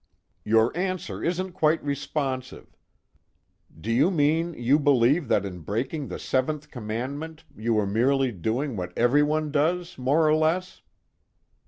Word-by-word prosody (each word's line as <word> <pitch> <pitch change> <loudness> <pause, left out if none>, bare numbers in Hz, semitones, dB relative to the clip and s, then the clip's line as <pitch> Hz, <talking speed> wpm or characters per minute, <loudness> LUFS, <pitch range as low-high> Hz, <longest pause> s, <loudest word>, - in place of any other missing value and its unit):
"Your 110 +4 +3
answer 185 0 -3
isn't 180 +2 -1
quite 160 -1 +1
responsive. 140 -2 -4 1.0
Do 110 +8 -3
you 130 +9 +4
mean 165 0 +1
you 130 +5 +2
believe 140 +1 +3
that 100 -3 +2
in 90 -2 -6
breaking 130 - -3
the - - -5
seventh 150 +3 -2
commandment 135 +8 -5
you 115 +1 -1
were 105 -1 +2
merely 130 +6 +2
doing 115 - -2
what 90 -2 -6
everyone 150 +5 +2
does 170 +3 0
more 145 +5 +3
or 155 - +4
less?" 165 +4 0
140 Hz, 135 wpm, -25 LUFS, 120-155 Hz, 1.0 s, you